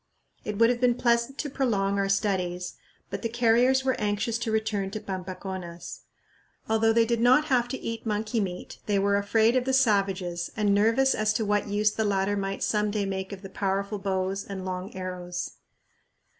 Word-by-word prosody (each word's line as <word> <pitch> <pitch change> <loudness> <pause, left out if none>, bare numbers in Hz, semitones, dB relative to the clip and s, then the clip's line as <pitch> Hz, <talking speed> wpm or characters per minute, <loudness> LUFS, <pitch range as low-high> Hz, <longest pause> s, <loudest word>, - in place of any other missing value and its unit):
It 210 -1 -4
would 230 +2 +5
have 245 0 -3
been 245 -1 +4
pleasant 235 +2 +1
to 300 - -2
prolong 200 -8 0
our 195 0 0
studies, 185 -3 -1 0.4
but - - -4
the 230 - -2
carriers 240 +3 +3
were 260 -1 +2
anxious 210 +2 0
to 230 -2 -2
return 220 -3 0
to 215 +2 -5
Pampaconas. 185 -3 -6 0.7
Although 225 0 +3
they 230 0 +4
did 235 0 0
not 255 +5 +5
have 245 -1 +3
to 260 +2 -4
eat 230 0 -5
monkey 215 +1 -1
meat, 180 -3 -4
they 205 -1 +2
were 200 +1 +2
afraid 220 +4 +3
of 255 -1 +2
the 265 - 0
savages 195 -8 +1
and 205 -2 +2
nervous 230 +6 +3
as 215 0 +1
to 220 -1 -1
what 205 0 +1
use 210 +1 +2
the 220 - -1
latter 200 -1 +1
might 195 -1 -2
some 210 -1 +1
day 205 -1 -1
make 190 0 -4
of 200 0 -8
the - - -6
powerful 200 +1 -1
bows 190 0 -1
and 190 -2 -6
long 185 +1 -4
arrows. 180 -1 -5
205 Hz, 190 wpm, -27 LUFS, 195-230 Hz, 0.7 s, would